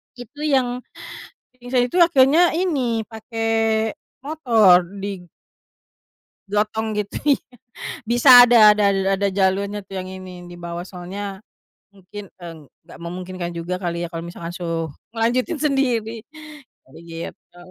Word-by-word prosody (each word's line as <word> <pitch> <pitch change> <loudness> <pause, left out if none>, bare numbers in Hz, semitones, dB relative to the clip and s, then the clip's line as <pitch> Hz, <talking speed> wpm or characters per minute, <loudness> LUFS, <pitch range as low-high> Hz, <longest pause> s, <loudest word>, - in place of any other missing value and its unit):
Itu 245 +4 -12
yang 255 -4 +1 0.8
pingsan 245 0 0
itu 250 - -6
akhirnya 330 +1 +5
ini 255 - -1
pake 225 +1 -12 0.9
motor 230 - +4 0.2
di 195 -2 -5 1.3
gotong 215 +1 -1
gitu, 210 -1 -3 0.2
iya - - -16 0.6
bisa 245 +2 +8
ada 220 -4 +7
ada 210 - +1 0.3
ada 200 +1 0
jalurnya 200 +2 0
tuh 195 -1 -10
yang 185 0 -5
ini 185 -1 -10
dibawa 175 0 -7
soalnya, 190 +2 -7 0.5
mungkin, 200 +1 -11
eee, 165 -3 -10 0.2
gak - - -12
memungkinkan 180 0 -6
juga 170 +2 -4
kali 175 -2 -4
ya 170 - -5
kalo 165 0 -7
misalkan 170 0 -7
suruh 165 -2 -3 0.2
ngelanjutin 250 +7 -1
sendiri, 240 -6 -1 0.6
jadi 135 +5 -16 0.3
gitu. - - -19
205 Hz, 120 wpm, -21 LUFS, 180-245 Hz, 1.3 s, bisa